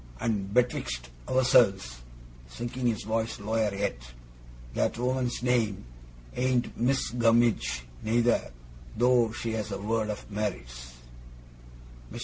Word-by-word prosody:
And 100 Hz, -4 st, -1 dB
betwixt 65 Hz, -, 0 dB, 0.2 s
ourselves,' 100 Hz, -, +3 dB, 0.5 s
sinking 120 Hz, -, -3 dB
his 115 Hz, -3 st, 0 dB
voice 110 Hz, +1 st, -2 dB
lower 110 Hz, +1 st, 0 dB
yet, 100 Hz, -9 st, -2 dB, 0.7 s
'that -, -, 0 dB
woman's 125 Hz, 0 st, -1 dB
name 115 Hz, -, +1 dB, 0.5 s
ain't 125 Hz, -1 st, 0 dB
Missis 125 Hz, +2 st, +1 dB
Gummidge 115 Hz, -, +2 dB, 0.2 s
neither, 115 Hz, +2 st, +2 dB, 0.5 s
though 120 Hz, -1 st, +4 dB
she 110 Hz, +1 st, -4 dB
has 110 Hz, -1 st, -3 dB
a 100 Hz, -, -2 dB
world 110 Hz, +1 st, -1 dB
of 105 Hz, 0 st, -6 dB
merits.' -, -, -4 dB, 1.2 s
Mr. -, -, -7 dB
110 Hz, 115 wpm, -28 LUFS, 100-120 Hz, 1.2 s, though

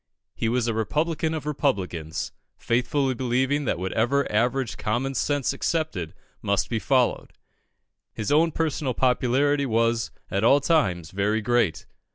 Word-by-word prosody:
He 115 Hz, -, -1 dB
was 120 Hz, 0 st, 0 dB
a 115 Hz, -, +1 dB
Republican 155 Hz, +8 st, -1 dB
of 155 Hz, -, -5 dB
Republicans, 95 Hz, -, -2 dB, 0.3 s
faithfully 130 Hz, +3 st, 0 dB
believing 130 Hz, +4 st, 0 dB
that -, -, 0 dB
whatever 115 Hz, +10 st, 0 dB
average 120 Hz, +3 st, 0 dB
common 125 Hz, +5 st, -1 dB
sense 145 Hz, +1 st, 0 dB
accepted 155 Hz, -, -2 dB, 0.3 s
must 100 Hz, +3 st, 0 dB
be 115 Hz, -, 0 dB
followed. 130 Hz, +1 st, +1 dB, 0.8 s
His 110 Hz, +3 st, -4 dB
own 160 Hz, +3 st, +4 dB
personal 150 Hz, -5 st, -1 dB
popularity 135 Hz, +3 st, +2 dB
was 115 Hz, -1 st, +1 dB, 0.2 s
at 100 Hz, +1 st, 0 dB
all 140 Hz, +5 st, +6 dB
times 95 Hz, -, +1 dB
very 105 Hz, +3 st, 0 dB
great. 110 Hz, -6 st, +1 dB
125 Hz, 135 wpm, -25 LUFS, 110-145 Hz, 0.8 s, all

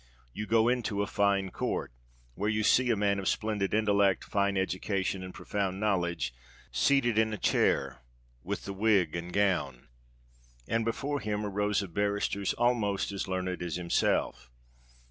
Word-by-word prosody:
You 105 Hz, +1 st, -5 dB
go 115 Hz, 0 st, +4 dB
into 120 Hz, -5 st, 0 dB
a -, -, -1 dB
fine 100 Hz, -2 st, +1 dB
court, -, -, -3 dB, 0.4 s
where 105 Hz, -, -1 dB
you 110 Hz, 0 st, 0 dB
see 125 Hz, +3 st, +4 dB
a 115 Hz, -, +3 dB
man 100 Hz, -1 st, +1 dB
of 95 Hz, -, -4 dB
splendid 105 Hz, -3 st, 0 dB
intellect, 100 Hz, -3 st, +2 dB
fine 100 Hz, -1 st, 0 dB
education, 95 Hz, 0 st, -1 dB
and 95 Hz, 0 st, -7 dB
profound 95 Hz, -1 st, -3 dB
knowledge, 90 Hz, -, 0 dB, 0.4 s
seated 120 Hz, -6 st, +3 dB
in 110 Hz, 0 st, +2 dB
a -, -, -3 dB
chair, -, -, +1 dB, 0.4 s
with -, -, -4 dB
the 100 Hz, -, -4 dB
wig 100 Hz, -5 st, +2 dB
and 85 Hz, +1 st, -5 dB
gown; 85 Hz, -12 st, 0 dB, 0.8 s
and 115 Hz, +1 st, +1 dB
before 140 Hz, +6 st, -2 dB
him 105 Hz, -2 st, -2 dB
are 100 Hz, -, -3 dB
rows 105 Hz, 0 st, 0 dB
of 90 Hz, -4 st, -9 dB
barristers 100 Hz, 0 st, 0 dB
almost 115 Hz, -5 st, +1 dB
as 100 Hz, -, -4 dB
learned 95 Hz, -1 st, -2 dB
as 85 Hz, -3 st, -3 dB
himself. 85 Hz, -7 st, 0 dB
100 Hz, 160 wpm, -30 LUFS, 95-110 Hz, 0.8 s, go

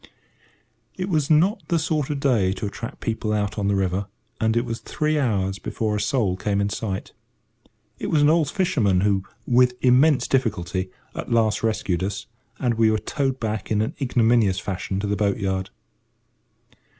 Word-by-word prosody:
It 185 Hz, +1 st, -3 dB
was 155 Hz, -5 st, +1 dB
not 175 Hz, +8 st, +3 dB
the 170 Hz, -, +1 dB
sort 155 Hz, -3 st, -1 dB
of 145 Hz, -2 st, -2 dB
day 115 Hz, -9 st, +2 dB
to 100 Hz, +3 st, -5 dB
attract 115 Hz, +3 st, -6 dB
people 110 Hz, -1 st, -2 dB
out 105 Hz, 0 st, -1 dB
on 100 Hz, -, 0 dB
the 100 Hz, -, +2 dB
river, 95 Hz, +1 st, -1 dB, 0.3 s
and 110 Hz, +1 st, +1 dB
it 120 Hz, -, +1 dB
was 115 Hz, 0 st, -4 dB
three 155 Hz, 0 st, -1 dB
hours 100 Hz, -7 st, 0 dB
before 110 Hz, -2 st, -2 dB
a 105 Hz, -, -1 dB
soul 105 Hz, -4 st, +1 dB
came 100 Hz, +1 st, -1 dB
in 100 Hz, 0 st, +1 dB
sight. 100 Hz, -2 st, -4 dB, 0.9 s
It -, -, -3 dB
was 150 Hz, -2 st, +3 dB
an -, -, +6 dB
old 160 Hz, -3 st, +2 dB
fisherman 120 Hz, -, +1 dB
who, 100 Hz, -1 st, +2 dB, 0.2 s
with 125 Hz, 0 st, +4 dB
immense 130 Hz, +3 st, +4 dB
difficulty, 95 Hz, -7 st, -1 dB, 0.2 s
at -, -, -6 dB
last 110 Hz, -2 st, +2 dB
rescued 105 Hz, -5 st, 0 dB
us, 100 Hz, +1 st, -3 dB, 0.3 s
and 120 Hz, -3 st, -1 dB
we 110 Hz, -1 st, +5 dB
were 110 Hz, -, +2 dB
towed 135 Hz, +3 st, -2 dB
back 110 Hz, -2 st, -3 dB
in 105 Hz, -, +1 dB
an 110 Hz, -, -3 dB
ignominious 115 Hz, -6 st, +3 dB
fashion 95 Hz, 0 st, -3 dB
to -, -, -2 dB
the 100 Hz, 0 st, 0 dB
boat 100 Hz, -1 st, +1 dB
yard. 95 Hz, -2 st, -2 dB
110 Hz, 180 wpm, -23 LUFS, 100-130 Hz, 0.9 s, an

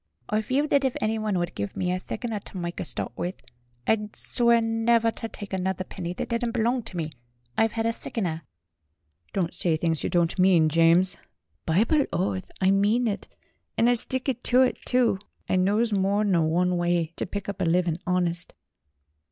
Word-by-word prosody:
"I 215 Hz, +1 st, +1 dB
feel 265 Hz, +6 st, 0 dB
thet 280 Hz, -2 st, +2 dB
if 265 Hz, -2 st, 0 dB
anyone 215 Hz, -2 st, 0 dB
wud 175 Hz, 0 st, -2 dB
give 100 Hz, -1 st, -5 dB
me 180 Hz, -1 st, 0 dB
a 180 Hz, -, -1 dB
thick 220 Hz, +5 st, -6 dB
'un 225 Hz, -3 st, -2 dB
ter 195 Hz, -, -10 dB
mike 175 Hz, 0 st, -4 dB
a -, -, -2 dB
stawt -, -, 0 dB
with, 180 Hz, +2 st, -3 dB, 0.5 s
I'd 210 Hz, +2 st, 0 dB
swear 235 Hz, -1 st, +4 dB
never 225 Hz, 0 st, +2 dB
ter 225 Hz, -, -6 dB
tike 205 Hz, -3 st, -9 dB
another 190 Hz, 0 st, -1 dB
penny 175 Hz, -2 st, -6 dB
that -, -, -5 dB
didn't 235 Hz, 0 st, -1 dB
belong 240 Hz, +1 st, +1 dB
ter 195 Hz, -5 st, -7 dB
me. 160 Hz, -2 st, -3 dB, 0.4 s
I've 225 Hz, 0 st, +1 dB
'ad 225 Hz, -, 0 dB
a 230 Hz, -, +1 dB
sickener." 175 Hz, -9 st, -3 dB, 0.9 s
"Don't 180 Hz, -3 st, -1 dB
say 165 Hz, -3 st, +1 dB
things 165 Hz, -1 st, -1 dB
you -, -, -1 dB
don't 170 Hz, +1 st, +1 dB
mean, 180 Hz, -4 st, +5 dB
James." 165 Hz, +3 st, +4 dB, 0.2 s
' 80 Hz, 0 st, -48 dB
"Bible 230 Hz, -, +3 dB
oath, 185 Hz, +1 st, -2 dB
I 190 Hz, 0 st, +3 dB
mean 210 Hz, +5 st, +2 dB
it, 210 Hz, -1 st, -3 dB, 0.5 s
and 230 Hz, -, +4 dB
'ud 245 Hz, -, +4 dB
stick 260 Hz, +2 st, -3 dB, 0.2 s
ter 255 Hz, +1 st, +4 dB
it, -, -, -3 dB
too! 245 Hz, -6 st, +2 dB, 0.3 s
I -, -, +1 dB
knows 205 Hz, +5 st, +2 dB
more 200 Hz, +1 st, +2 dB
nor 175 Hz, -6 st, +2 dB
one 180 Hz, +2 st, +1 dB
way 175 Hz, -1 st, 0 dB
ter -, -, -3 dB
pick 200 Hz, +1 st, -5 dB
up 200 Hz, -1 st, -4 dB
a -, -, +2 dB
living 170 Hz, 0 st, +1 dB
honist." 175 Hz, -1 st, -1 dB
190 Hz, 195 wpm, -26 LUFS, 175-225 Hz, 0.9 s, mean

